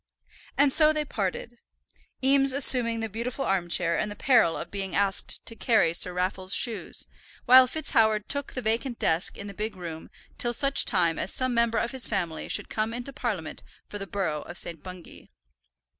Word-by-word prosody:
And 280 -1 +4
so 310 -1 +5
they 305 -1 -2
parted, 225 +1 -4 0.6
Eames 275 0 +4
assuming 245 -4 +3
the 225 - -2
beautiful 235 +5 -4
arm 185 -3 -1
chair 170 -1 +1
and 210 - -1
the 205 - -7
peril 230 -12 +3
of - - -7
being 195 -3 -4
asked 200 -1 +1
to 230 - -6
carry 220 -8 +2
Sir 180 +1 +2
Raffle's 185 +1 -1
shoes, 230 -3 -2 0.4
while 255 +1 +8
FitzHoward 225 -8 +1
took 285 -1 -2
the 255 - -5
vacant 230 +3 -1
desk 160 +3 0
in 200 - -7
the 200 - -8
big 215 +2 -4
room 165 -3 -8 0.3
till 240 0 -1
such 275 +2 +3
time 170 -4 +1
as 190 - -1
some 255 -1 0
member 235 -1 +1
of 235 - -1
his 260 -2 -1
family 175 -6 -3
should - - -2
come 220 +1 -2
into 245 +3 -6
Parliament 215 - -4 0.3
for 205 - -7
the 195 - -6
borough 165 -5 -2
of 175 - -10
St. 165 -3 -4
Bungay. 180 -2 -12
220 Hz, 190 wpm, -26 LUFS, 185-250 Hz, 0.6 s, while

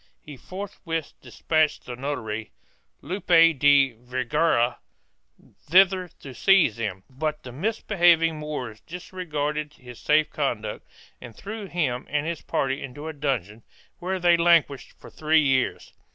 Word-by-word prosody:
He 150 - -9
forthwith 170 0 -6
despatched 155 -1 0
the 125 - -6
notary, 115 -5 -4 0.5
Lope 190 +4 -6
de 145 -6 +5
Vergara, 125 +1 0 0.9
thither 185 +1 +5
to 135 - -9
seize 180 - +4
them, 95 -5 -4
but 150 +3 -4
the 125 - -9
misbelieving 170 - +2
Moors 130 -8 -5
disregarded 150 -4 -4
his 125 -2 -13
safe 155 0 +2
conduct - - -3 0.3
and 115 -3 -11
threw 210 0 -7
him 150 -9 -2
and 150 0 -1
his 165 -1 -4
party 135 +1 -2
into 140 +3 -8
a 160 - -5
dungeon 120 - -3 0.4
where 185 +1 -2
they 175 -1 +4
languished 170 -5 +2
for - - -14
three 155 0 +2
years. 130 -2 0
150 Hz, 130 wpm, -25 LUFS, 130-170 Hz, 0.9 s, de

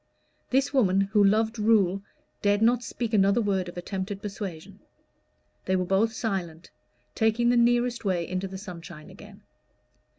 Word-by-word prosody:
This 270 +2 +1
woman, 195 -8 +3
who 205 +1 +2
loved 220 +3 +2
rule, 200 -3 +3 0.4
dared 205 +1 +2
not 240 +1 +3
speak 235 -2 -5
another 200 +2 +4
word 195 -5 0
of 175 - -11
attempted 190 +2 -4
persuasion. 195 -2 -7 0.9
They 190 - +1
were 185 -1 0
both 195 +5 +2
silent, 185 -8 -4 0.4
taking 225 +2 +2
the 245 - +3
nearest 240 0 +2
way 180 -4 -1
into 185 +1 -3
the 190 0 -8
sunshine 175 -4 -10
again. 205 +1 -14
200 Hz, 145 wpm, -26 LUFS, 190-225 Hz, 0.9 s, another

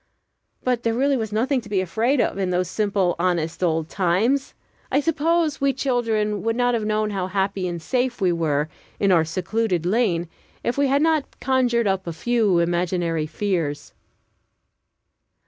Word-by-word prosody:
But 250 -2 0
there 230 -1 0
was - - -2
really 235 -5 0
nothing 250 +5 +1
to 215 - -13
be 200 -2 +1
afraid 225 +9 +1
of 200 - 0
in 190 -2 0
those 180 0 0
simple, 195 -2 0
honest 170 -2 -1
old 160 -3 +1
times. 200 +11 0 0.4
I - - +3
suppose 325 0 +1
we 275 0 +3
children 225 -6 0
would 225 0 0
not 245 0 +2
have 220 -3 -1
known 215 0 0
how 190 -2 -2
happy 190 0 -1
and 175 -1 -4
safe 245 +8 -1
we 185 -3 +2
were, 155 -3 0 0.3
in 200 -1 +3
our 165 -3 +5
secluded 180 +2 -1
lane, 180 -4 +1 0.4
if 240 - 0
we 280 0 +2
had 280 +2 +2
not 320 -3 0
conjured 245 -3 +2
up 190 -2 0
a 170 - -3
few 220 0 +1
imaginary 170 -2 0
fears. 165 -4 -2
205 Hz, 165 wpm, -23 LUFS, 175-245 Hz, 0.4 s, our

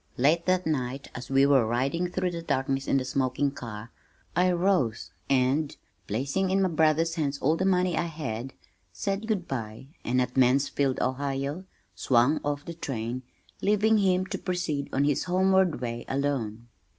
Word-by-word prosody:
Late 160 +7 +2
that 185 0 +2
night 135 -3 -2
as 125 - -8
we 135 +1 +4
were 140 -3 +5
riding 135 +10 0
through 180 0 -1
the 170 -1 -5
darkness 135 -3 -1
in - - +3
the 130 - -1
smoking 130 +1 0
car, 115 -4 -8 0.4
I 180 +1 +3
rose 170 - 0 0.2
and, 135 +3 +1 0.3
placing 140 - -1
in 190 +1 +2
my 185 - +2
brother's 160 0 +2
hands 145 -3 -1
all 150 +4 +2
the 190 - -1
money 180 -2 +2
I 170 - 0
had, 135 -6 -5 0.4
said 195 - -3
good 200 -6 -1
bye, 115 0 -5
and 125 +2 +1
at 125 0 -1
Mansfield, 135 +1 +2
Ohio, 140 +5 -2 0.3
swung 130 +4 +2
off 145 0 -2
the 170 - -6
train, 125 -6 -4 0.4
leaving 210 +2 +3
him 185 -2 +2
to - - -5
proceed 170 -6 -2
on 140 - +1
his 145 -1 +1
homeward 190 -2 +2
way 120 -1 -4
alone. 125 -5 -2
140 Hz, 165 wpm, -27 LUFS, 130-175 Hz, 0.4 s, were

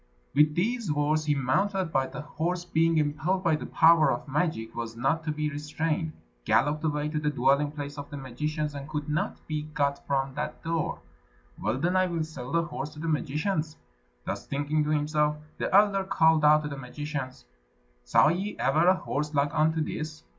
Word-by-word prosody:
With 150 +2 +4
these 225 0 0
words 150 +1 +1
he 150 -1 +2
mounted, 180 +7 0
but 135 0 +1
the 150 - -6
horse 170 +4 -3
being 165 -1 +2
impelled 155 +5 0
by 165 -3 +3
the - - -5
power 160 -3 +5
of 120 - -3
magic 145 -7 -1
was 115 -1 -5
not 135 +7 0
to 155 - 0
be 150 0 -2
restrained, 155 +2 -2 0.3
galloped 150 - +2
away 150 -1 0
to 155 0 -1
the 150 0 0
dwelling 140 +1 +2
place 145 -1 -6
of 145 - -7
the 145 - -6
magicians, 150 +3 -3
and 140 +1 -7
could 150 -1 -3
not 150 0 -2
be 155 -1 -2
got 145 -2 -1
from 135 -1 0
the 150 +2 -3
door. 165 -1 -2 0.6
"Well, 110 +4 0
then, 175 +7 0
I 185 0 +3
will 170 -2 -1
sell 140 -5 -7
the 170 0 +2
horse 155 -3 -5
to - - -10
the 165 - -4
magicians." 155 +2 -1 0.5
Thus - - -4
thinking 145 +2 0
to - - -2
himself, 150 0 +1 0.2
the - - -1
elder 200 0 +5
called 160 -4 +3
out 150 +1 +6
to 150 - -3
the 140 - -6
magicians, 135 - -6 0.6
"Saw - - +5
ye 190 +5 -2
ever 155 +5 +2
a 185 - +6
horse 150 -3 -3
like 145 +2 +1
unto 160 0 +2
this? 155 0 -5
150 Hz, 195 wpm, -28 LUFS, 145-160 Hz, 0.6 s, out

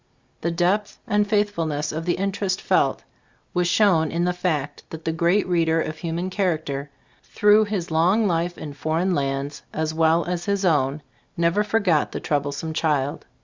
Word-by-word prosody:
The 170 - 0
depth 180 +5 0
and 210 -3 +1
faithfulness 170 -9 0
of 160 +1 -4
the 175 - +1
interest 195 -1 -1
felt, - - +1 0.5
was 180 -1 +1
shown 175 -5 +3
in 170 +3 0
the 180 - +1
fact 155 -6 -2
that 160 0 -9
the 160 - +1
great 170 +5 +2
reader 165 -2 +2
of 155 -1 -3
human 170 +3 -3
character, 155 -7 -1 0.3
through 210 +1 +4
his 195 -5 -3
long 180 +8 +3
life 175 -1 0
in 150 -2 -7
foreign 160 +6 0
lands 140 -1 -2
as 155 0 -2
well 165 +1 +3
as 175 -1 -3
his 200 -1 0
own, 145 -3 +1 0.3
never 170 +5 +2
forgot 200 -7 +1
the - - -3
troublesome 145 +2 -2
child. 145 -3 -1
170 Hz, 165 wpm, -23 LUFS, 155-190 Hz, 0.5 s, through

